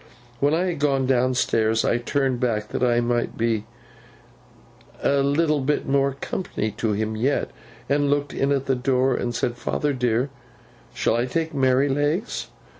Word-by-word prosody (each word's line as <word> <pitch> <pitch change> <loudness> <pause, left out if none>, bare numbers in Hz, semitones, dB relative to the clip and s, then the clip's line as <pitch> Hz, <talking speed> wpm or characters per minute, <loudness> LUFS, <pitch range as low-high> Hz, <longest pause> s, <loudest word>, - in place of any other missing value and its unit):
When 145 +4 +3
I 170 - +1
had 175 -5 -2
gone 135 -2 +2
down 130 0 +2
stairs, 110 -2 +1
I 120 - +2
turned 130 0 0
back 110 -4 -1
that - - -3
I 120 -1 +3
might 120 0 -1
be 110 -2 0 1.4
a 140 0 +3
little 150 +2 +2
bit 145 +2 0
more 140 0 +2
company 135 - -3
to 110 -2 0
him 110 +1 -2
yet, 130 +6 0 0.4
and 145 +1 +2
looked 145 0 0
in 140 +1 0
at 135 -1 0
the 135 - +1
door, 130 0 +1
and 120 -1 -2
said, 120 0 -1
"Father 145 -1 -1
dear, 125 +1 0 0.6
shall - - 0
I 120 +1 +1
take 160 +4 -2
Merrylegs?" 140 - +1
130 Hz, 165 wpm, -23 LUFS, 120-145 Hz, 1.4 s, When